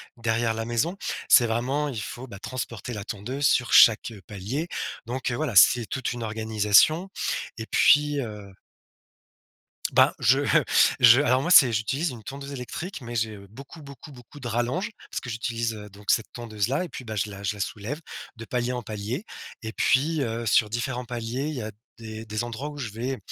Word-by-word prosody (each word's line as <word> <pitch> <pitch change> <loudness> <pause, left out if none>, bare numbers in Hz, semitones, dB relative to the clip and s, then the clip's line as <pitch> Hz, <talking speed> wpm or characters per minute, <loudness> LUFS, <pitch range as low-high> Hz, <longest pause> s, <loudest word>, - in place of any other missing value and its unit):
derrière 115 -1 0
la 115 - -3
maison, 120 +11 -1 0.3
c'est 120 - +7
vraiment, 130 +6 -1
il 115 -6 -4
faut, 120 +6 -7
bah, 100 -5 -10
transporter 120 -2 -5
la 100 -2 -5
tondeuse 125 +8 -4
sur 125 -1 +2
chaque, 115 +1 +7
heu, 105 -4 -12
palier, 105 - -4 0.4
donc 125 +1 -3
voilà, 125 -1 -2
c'est 120 +3 +7
toute 130 +2 -3
une 120 -1 -6
organisation 110 - +3 0.5
et 110 - -5
puis, 145 +1 +4
heu 105 -4 -8 1.4
Ben, - - +6
je, - - +4
heu, - - +3 0.4
je 120 +3 +8
alors 130 -2 +2
moi, 170 - -2
c'est 135 -8 +8
j'utilise 135 +9 -1
une 120 -3 -9
tondeuse 140 +4 -8
électrique, 140 +7 -6
mais 120 -1 -7
j'ai 110 -2 -1
beaucoup, 140 +7 -12
beaucoup, 140 +1 -12
beaucoup 130 +3 -14
de 125 - -5
rallonges 120 - -1 0.2
parce - - -4
que 120 - -8
j'utilise, 115 0 -2
heu, 105 -1 -10
donc 100 +1 -3
cette 115 - +1
tondeuse-là 120 - -2
et 175 - -7
puis, 130 - -9
bah, 110 -1 -5
je 105 - -1
la 100 - -9
je 105 +1 -1
la 100 - -6
soulève, 115 - -4 0.3
de 115 - -9
palier 125 +1 -2
en 125 - -3
palier. 110 - -4 0.4
Et 110 0 -5
puis, 150 +7 +2
heu, 115 -1 -3
sur 105 0 +3
différents 120 +2 -3
paliers, 120 +3 -4
il 155 - -4
y 125 - -4
a 110 0 -5 0.3
des 110 -1 -8
des 110 +1 -3
endroits 120 +5 -5
où 145 - -10
je 125 -6 -4
vais 125 +5 -4
120 Hz, 195 wpm, -25 LUFS, 110-135 Hz, 1.4 s, je